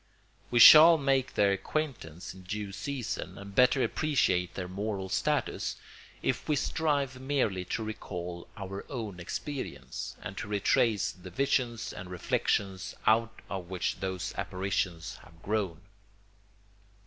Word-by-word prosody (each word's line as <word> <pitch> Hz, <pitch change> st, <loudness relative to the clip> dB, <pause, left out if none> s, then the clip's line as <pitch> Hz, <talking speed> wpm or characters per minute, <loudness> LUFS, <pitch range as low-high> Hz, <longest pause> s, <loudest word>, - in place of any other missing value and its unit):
We 120 Hz, -, 0 dB
shall 160 Hz, +7 st, +11 dB
make 135 Hz, -3 st, +1 dB
their 100 Hz, -1 st, +4 dB
acquaintance 100 Hz, -, -3 dB
in 95 Hz, -, -13 dB
due 100 Hz, +2 st, -4 dB
season 115 Hz, +3 st, -4 dB
and 100 Hz, 0 st, -9 dB
better 125 Hz, +3 st, +5 dB
appreciate 90 Hz, -, +1 dB
their 90 Hz, -2 st, -4 dB
moral 95 Hz, 0 st, -3 dB
status, -, -, 0 dB, 0.5 s
if -, -, -1 dB
we 150 Hz, -, +3 dB
strive 140 Hz, -3 st, 0 dB
merely 125 Hz, -10 st, 0 dB
to 115 Hz, +5 st, -2 dB
recall 90 Hz, -5 st, -6 dB
our 100 Hz, 0 st, -6 dB
own 110 Hz, -8 st, -5 dB
experience, 140 Hz, -, -5 dB
and -, -, -7 dB
to -, -, -5 dB
retrace 105 Hz, +1 st, +2 dB
the 90 Hz, 0 st, -11 dB
visions 120 Hz, 0 st, 0 dB
and 90 Hz, 0 st, -8 dB
reflections 95 Hz, +1 st, -1 dB
out 110 Hz, 0 st, +2 dB
of 95 Hz, -3 st, -5 dB
which 90 Hz, -2 st, -2 dB
those 95 Hz, -1 st, -3 dB
apparitions 95 Hz, -3 st, -2 dB
have 85 Hz, +1 st, -18 dB
grown. 100 Hz, -6 st, -1 dB
100 Hz, 130 wpm, -30 LUFS, 95-130 Hz, 0.5 s, shall